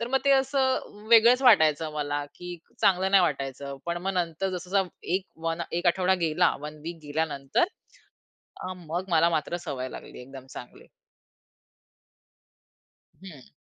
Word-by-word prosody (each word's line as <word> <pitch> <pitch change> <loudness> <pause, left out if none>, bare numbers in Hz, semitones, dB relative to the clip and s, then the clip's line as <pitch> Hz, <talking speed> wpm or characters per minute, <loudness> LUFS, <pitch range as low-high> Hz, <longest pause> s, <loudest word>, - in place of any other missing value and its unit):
तर 235 - -3
मग - - +5
ते 280 - +4
असं 260 -6 -1
वेगळंच 235 +3 +7
वाटायचं 160 - +5
मला, 145 -1 -2
की 180 0 -9 0.3
चांगलं 190 0 +3
नाही 195 -2 +6
वाटायचं. 140 -2 -3
पण 170 0 -1
मग 195 - +1
नंतर 170 +3 -3
जसं 180 +1 -9
जसा 195 -1 +3 0.3
एक 190 0 0 0.2
वन 165 +1 -1 0.2
एक 175 - -3
आठवडा 190 0 +2
गेला, 165 +3 +2
1 150 +1 -7
वीक 170 0 -6
गेल्यानंतर 145 - 0 1.0
अ, 185 - -4
मग 175 +2 -5
मला 170 +2 +5
मात्र 165 +2 -1
सवय 130 -2 -4
लागली 125 - -10
एकदम 135 0 -11
चांगली. 125 - -11 2.4
हं. 150 -9 -12
170 Hz, 145 wpm, -27 LUFS, 150-190 Hz, 2.4 s, वेगळंच